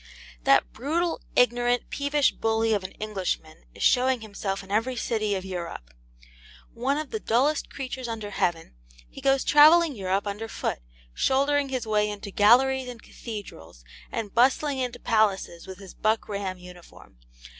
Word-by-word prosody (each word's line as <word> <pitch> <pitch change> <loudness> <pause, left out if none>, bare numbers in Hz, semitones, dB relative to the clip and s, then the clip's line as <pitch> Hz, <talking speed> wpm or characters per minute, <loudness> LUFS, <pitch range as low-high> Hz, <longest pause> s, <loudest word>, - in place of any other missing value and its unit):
That 135 - +4
brutal, 325 +7 -1
ignorant, 245 0 +2
peevish 285 0 +1
bully 225 0 0
of 205 -2 0
an 185 - -7
Englishman 190 -7 -4
is - - -5
showing 255 -1 +3
himself 200 -2 -4
in 195 - -13
every 225 +5 0
city 215 -3 -1
of 190 0 -4
Europe. 170 - -6 0.8
One 265 +5 -1
of 305 -1 -5
the 440 - -2
dullest 280 - +1
creatures 260 -2 -6
under 220 -3 -5
heaven, 170 -4 -1 0.3
he - - -12
goes 270 0 +2
travelling 310 +2 +6
Europe 195 0 -1
under 210 +2 -4
foot, - - -3 0.3
shouldering 280 - +1
his 255 -3 -3
way 210 -1 +1
into 205 -1 -7
galleries 255 +6 +4
and 240 -2 -10
cathedrals, 85 - -9 0.3
and 220 -4 -4
bustling 265 +3 +2
into 250 -2 -3
palaces 200 -6 0
with 190 -1 -8
his 195 -1 -12
buck 215 +1 0
ram 200 -2 -4
uniform. 180 - -15
225 Hz, 155 wpm, -26 LUFS, 195-260 Hz, 0.8 s, travelling